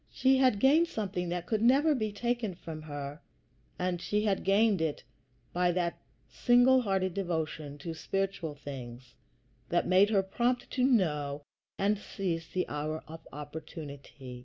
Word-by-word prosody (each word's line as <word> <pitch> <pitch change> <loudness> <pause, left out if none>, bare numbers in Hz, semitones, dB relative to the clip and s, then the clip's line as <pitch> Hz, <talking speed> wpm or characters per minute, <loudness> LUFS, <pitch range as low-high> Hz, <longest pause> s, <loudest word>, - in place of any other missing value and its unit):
She 265 0 +3
had 255 -5 +4
gained 300 +7 +5
something 190 - -3
that 175 0 -3
could 215 +1 0
never 275 +6 +5
be 215 -6 -1
taken 235 -2 -2
from 160 -2 -8
her; 145 0 -6 0.6
and 180 -1 -1
she 210 +2 0
had 200 -3 0
gained 200 -1 +3
it 160 -2 -1 0.5
by 180 0 +2
that 175 -1 -1 0.3
single 245 +1 +4
hearted 190 -4 0
devotion 160 -6 -3
to 165 +3 -6
spiritual 190 -2 -2
things 125 -3 -9 0.6
which - - +2
made 190 +3 +5
her 200 -3 +3
prompt 240 +6 -1
to 255 - 0
know 150 - +1 0.3
and 200 +1 +1
seize 170 -6 -3
the 180 +2 -2
hour 155 +2 -3
of 160 +1 -11
opportunity. 145 -3 -8
180 Hz, 150 wpm, -30 LUFS, 155-215 Hz, 0.6 s, gained